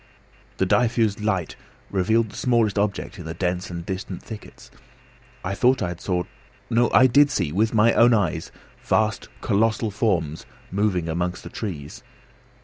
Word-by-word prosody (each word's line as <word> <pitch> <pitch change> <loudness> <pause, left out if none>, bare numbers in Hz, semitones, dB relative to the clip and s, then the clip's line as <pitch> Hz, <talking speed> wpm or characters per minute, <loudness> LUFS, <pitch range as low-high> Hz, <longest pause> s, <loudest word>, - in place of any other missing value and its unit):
The 95 - +2
diffused 115 -1 +2
light 95 -6 -1 0.4
revealed 110 +3 +1
the - - -13
smallest 115 -5 +1
object 100 0 -2
in 90 - -8
the 80 0 -5
dense 90 +1 -2
and 85 -1 -6
distant 95 -1 -5
thickets. 110 -2 -11 0.7
I 95 - -3
had 100 - -4
thought 130 +1 +3
I 90 - -2
saw 90 0 -1 0.5
no! 120 +1 +3
I 130 - +6
did 140 +3 +5
see, 90 - -1
with 110 +6 +1
my 110 +2 +5
own 120 +1 +6
eyes, 90 -7 0 0.3
vast 110 -1 0
colossal 110 +1 +1
forms 90 -8 -1 0.2
moving 95 -4 0
amongst 90 +2 -2
the - - -8
trees. 80 -10 -6
100 Hz, 155 wpm, -23 LUFS, 90-115 Hz, 0.7 s, I